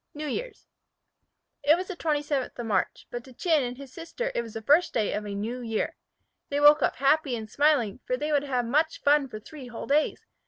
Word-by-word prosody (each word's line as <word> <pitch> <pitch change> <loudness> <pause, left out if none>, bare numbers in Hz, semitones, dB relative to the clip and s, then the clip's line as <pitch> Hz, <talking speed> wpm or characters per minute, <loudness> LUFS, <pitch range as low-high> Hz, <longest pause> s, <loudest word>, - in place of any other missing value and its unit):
NEW 305 +1 -5
YEAR'S 455 - -5 1.0
IT 300 +3 +5
was 365 +1 -4
the 375 - -4
27th 295 -5 -1
of 240 - -4
March, 215 -3 -1
but 240 0 -5
to 260 - -14
Chin 320 +3 +2
and 245 -1 -4
his 275 -2 -11
sister 485 +10 -4
it - - 0
was 225 -2 -10
the 225 - -4
first 295 +9 +4
day 215 -3 +1
of 210 0 -3
a 200 - -4
new 230 +5 -3
year. 225 -2 -2 0.5
They 285 - 0
woke 295 +1 +7
up - - +1
happy 275 -1 +2
and 220 -2 -6
smiling, 270 -4 +2
for 250 - 0
they 300 +3 -2
would 290 -2 +3
have 250 -3 0
much 305 +7 +1
fun 290 -1 +4
for 215 - -7
three 265 +4 -11
whole 240 -2 -7
days. 295 +2 +1
280 Hz, 225 wpm, -27 LUFS, 240-305 Hz, 1.0 s, woke